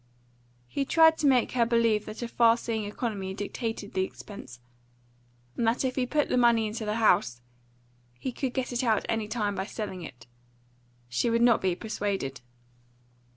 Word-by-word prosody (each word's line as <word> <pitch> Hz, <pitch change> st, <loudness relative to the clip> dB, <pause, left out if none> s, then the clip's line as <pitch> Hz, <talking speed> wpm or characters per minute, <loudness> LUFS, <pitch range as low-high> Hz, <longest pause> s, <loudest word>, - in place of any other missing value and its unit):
He 275 Hz, -, -2 dB
tried 320 Hz, +3 st, +5 dB
to 295 Hz, -, +2 dB
make 255 Hz, -3 st, +3 dB
her 245 Hz, -2 st, +2 dB
believe 230 Hz, -2 st, +2 dB
that 215 Hz, +3 st, -6 dB
a -, -, -2 dB
far 230 Hz, 0 st, +4 dB
seeing 225 Hz, -3 st, -3 dB
economy 205 Hz, -3 st, -4 dB
dictated 210 Hz, 0 st, -4 dB
the 190 Hz, -, +1 dB
expense; 190 Hz, -, -9 dB, 1.0 s
and 230 Hz, -, 0 dB
that 235 Hz, +4 st, +1 dB
if 255 Hz, -, -1 dB
he 255 Hz, -2 st, 0 dB
put 295 Hz, +2 st, +1 dB
the -, -, 0 dB
money 235 Hz, -2 st, +4 dB
into 215 Hz, +1 st, -4 dB
the 210 Hz, 0 st, -1 dB
house, 175 Hz, -, +3 dB, 0.8 s
he 185 Hz, -, -4 dB
could 255 Hz, 0 st, -4 dB
get 255 Hz, -1 st, -2 dB
it 245 Hz, +2 st, -1 dB
out 220 Hz, -4 st, +2 dB
any 225 Hz, -2 st, -1 dB
time 210 Hz, -2 st, -1 dB
by 190 Hz, 0 st, -3 dB
selling 205 Hz, -6 st, -5 dB
it. 125 Hz, -8 st, -10 dB, 0.8 s
She 120 Hz, -, 0 dB
would 230 Hz, 0 st, +2 dB
not 240 Hz, -2 st, +5 dB
be 185 Hz, -2 st, +1 dB
persuaded. 195 Hz, -, -3 dB
225 Hz, 175 wpm, -28 LUFS, 200-240 Hz, 1.0 s, tried